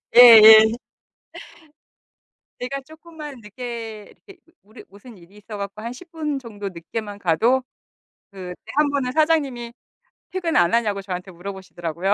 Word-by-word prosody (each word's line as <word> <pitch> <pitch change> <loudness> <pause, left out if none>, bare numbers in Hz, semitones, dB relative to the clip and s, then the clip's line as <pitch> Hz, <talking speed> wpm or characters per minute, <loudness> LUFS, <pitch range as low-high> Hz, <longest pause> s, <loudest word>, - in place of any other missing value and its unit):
예예. 220 -2 +9 1.8
제가 275 +3 -5
쪼끔만 310 -2 -12
늦게 225 -1 -8
이렇게 390 -4 -16 0.2
무리 210 +2 -16
무슨 205 +2 -15
일이 175 +4 -19
있어 210 +1 -10
갖고 200 +1 -7
한 230 +2 -6
10 340 +6 -15
분 300 -4 -3
정도 210 -5 -8
늦게만 205 +4 -7
가도 225 +10 +1 0.7
그 185 -3 -9
때 - - -14
1 300 -1 +3
번은 270 -3 -2
사장님이 285 -7 0 0.6
퇴근 360 -3 -3
안 175 +2 +3
하냐고 210 -4 0
저한테 185 -1 -7
물어 180 +4 -8
보시더라고요. 180 0 -3
225 Hz, 275 characters per minute, -21 LUFS, 200-270 Hz, 1.8 s, 예예